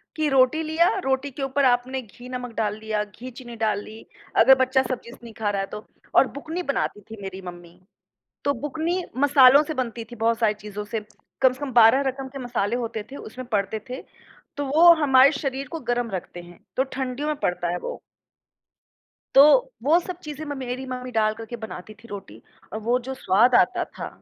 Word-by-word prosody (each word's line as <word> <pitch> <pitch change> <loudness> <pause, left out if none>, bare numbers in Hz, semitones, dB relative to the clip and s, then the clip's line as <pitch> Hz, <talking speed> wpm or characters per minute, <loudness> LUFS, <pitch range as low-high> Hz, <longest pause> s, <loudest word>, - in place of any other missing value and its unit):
कि 310 -1 0
रोटी 270 +3 +3
लिया, 320 +2 +2 0.2
रोटी 270 +1 0
के 275 - -6
ऊपर 270 +1 +1
आपने 255 +1 +1
घी 245 +2 -13
नमक 250 -2 -5
डाल 210 -1 -1
दिया, 215 -1 -2
घी 235 +5 -10
चीनी 240 0 -10
डाल 210 -2 +1
ली। 220 +1 -12 0.4
अगर 265 +3 +8
बच्चा 260 0 +3
सब्ज़ी 245 -2 -5
से - - -13
नहीं 230 -1 -10
ख़ा 215 -1 -2
रहा 200 -1 -1
है 195 - -3
तो। 210 - -7 0.3
और 270 - +6
बुकनी 325 +5 -4
बनाती 280 -8 -2
थी 220 -2 -9
मेरी 190 0 -7
मम्मी। 175 0 -13 0.7
तो 285 - +3
बुकनी 330 +5 -2 0.2
मसालों 280 0 +7
से 310 +1 -4
बनती 240 -4 -3
थी 240 - -7
बहुत 230 -1 +2
सारी 215 -2 +3
चीज़ों 210 0 -7
से। 220 +2 -3 0.4
कम 260 -1 +5
से 255 - -14
कम 285 -2 -4
12 235 +3 +7
रकम 265 0 -3
के 275 +1 -8
मसाले 240 -3 -1
होते 230 -3 -3
थे 280 - -7
उसमें 255 +3 -9
पड़ते 205 +1 0
थे। 255 +2 -5 0.6
तो 285 - -2
वो 315 +6 +6
हमारे 270 0 +6
शरीर 275 -1 -3
को 330 - -4
गर्म 240 -1 -1
रखते 175 -1 -6
हैं। 175 0 -15 0.2
तो 260 - +4
ठंडियों 260 +2 -3
में 305 - 0
पड़ता 180 -1 -1
है 175 - -1
वो। - - -6 1.4
तो 275 - +10 0.4
वो 315 +6 +5
सब 360 0 -7
चीज़ें 300 0 -7
म 290 -1 -5
मेरी 255 0 -4
मम्मी 255 -1 -6
डाल 215 -2 +2
कर 225 - -7
के 240 - -7
बनाती 215 0 -9
थी - - -13
रोटी 185 - -9 0.3
और 220 - -3
वो 250 +1 +3
जो - - -2
स्वाद 240 0 +3
आता - - +3
था। - - -8
250 Hz, 210 wpm, -24 LUFS, 220-275 Hz, 1.4 s, तो